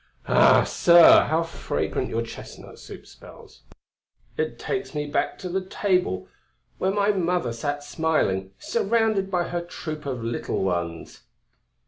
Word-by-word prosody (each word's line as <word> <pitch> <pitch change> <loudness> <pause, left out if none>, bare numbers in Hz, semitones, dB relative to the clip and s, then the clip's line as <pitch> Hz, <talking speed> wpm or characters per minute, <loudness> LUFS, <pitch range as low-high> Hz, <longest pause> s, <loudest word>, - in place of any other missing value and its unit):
Ah! - - +5
sir, 170 -1 +6
how 160 +2 +1
fragrant 165 - -3
your 115 +1 -2
chestnut 115 - -11
soup - - -11
smells! - - -16 0.7
It 155 0 -3
takes 195 -4 -4
me 150 0 -2
back 145 - -2
to 185 - -7
the 185 +2 -2
table 180 - -1 0.5
where 190 - +1
my 200 +1 +2
mother 175 - -1
sat 145 +5 -4
smiling, 145 - -1
surrounded 220 -3 0
by 180 -2 -1
her 175 0 -2
troop 155 -3 -7
of 125 -4 -4
little 115 -4 -2
ones." 85 -3 -3
160 Hz, 135 wpm, -24 LUFS, 120-185 Hz, 0.7 s, sir